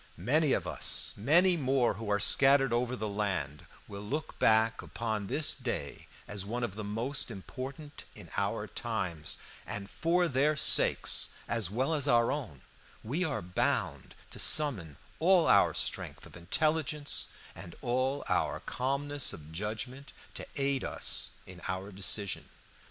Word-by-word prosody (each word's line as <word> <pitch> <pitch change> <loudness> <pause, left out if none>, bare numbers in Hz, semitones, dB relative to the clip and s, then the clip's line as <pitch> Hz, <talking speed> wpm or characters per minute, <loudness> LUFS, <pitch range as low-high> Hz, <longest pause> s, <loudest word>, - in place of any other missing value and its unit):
Many 140 - +2
of - - 0
us, - - +1
many 175 - +5
more 135 -5 +2
who 105 +1 -6
are 105 0 +2
scattered 135 0 +4
over 125 +1 0
the 110 -3 -3
land, 95 -9 -3 0.2
will 100 0 -8
look 140 +10 -4
back 110 +1 +3
upon 110 -3 -3
this 150 +8 +3
day 130 -3 -5 0.2
as 105 -2 -2
one 120 +5 -3
of 120 - -2
the 110 +2 -6
most 115 +8 -1
important 135 +7 -8
in - - -11
our - - -1
times, 95 -10 -3 0.3
and 100 -1 -5
for 175 +2 +2
their 145 +2 +2
sakes - - +4 0.2
as 115 -6 -1
well 130 +9 0
as 145 -2 +1
our 120 -3 +4
own 120 - -5 0.4
we 145 +11 -1
are 145 - -2
bound 90 +1 -1 0.2
to - - -6
summon 100 - +2 0.2
all 180 0 +5
our - - +5
strength - - -2
of - - -14
intelligence 150 - 0 0.3
and 85 - -9
all 130 +3 0
our - - 0
calmness 140 +2 -1
of 75 0 -11
judgment 110 - -5 0.2
to - - -5
aid 140 -2 0
us - - +1
in 90 -2 -12
our 95 +2 -4
decision. 100 +1 -3
120 Hz, 150 wpm, -31 LUFS, 100-140 Hz, 0.4 s, many